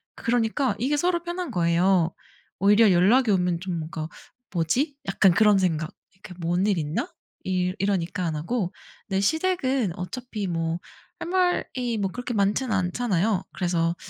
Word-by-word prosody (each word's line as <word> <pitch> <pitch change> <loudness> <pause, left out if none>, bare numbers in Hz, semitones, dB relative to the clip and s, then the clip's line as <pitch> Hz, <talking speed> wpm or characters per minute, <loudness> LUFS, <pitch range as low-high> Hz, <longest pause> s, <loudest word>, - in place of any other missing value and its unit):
그러니까 240 +3 0
이게 280 +5 +1
서로 345 +2 +1
편한 350 0 -4
거예요. 175 0 +2 0.5
오히려 205 +2 +5
연락이 210 +7 +4
오면 180 -3 +1
좀 180 -3 -3
뭔가 155 0 -5 0.5
'뭐지?' 250 - 0
약간 195 -2 +4
그런 210 0 +5
생각 165 -4 0 0.2
'이게 190 0 -12
뭔 175 +3 0
일 200 -4 +2
있나?' 150 0 -2 0.3
이 185 -1 0
이러니까 185 -2 -1
안 160 -2 -1
하고 180 +4 -2 0.3
근데 195 -2 0
시댁은 270 - +1
어차피 215 +2 -5
뭐 165 -1 -2 0.4
할 - - -5
말이 355 -10 0
뭐 195 -2 -1
그렇게 245 0 -4
많지는 210 +5 +1
않잖아요? 190 0 0
그래서 170 -2 0
195 Hz, 305 characters per minute, -25 LUFS, 175-245 Hz, 0.5 s, 오히려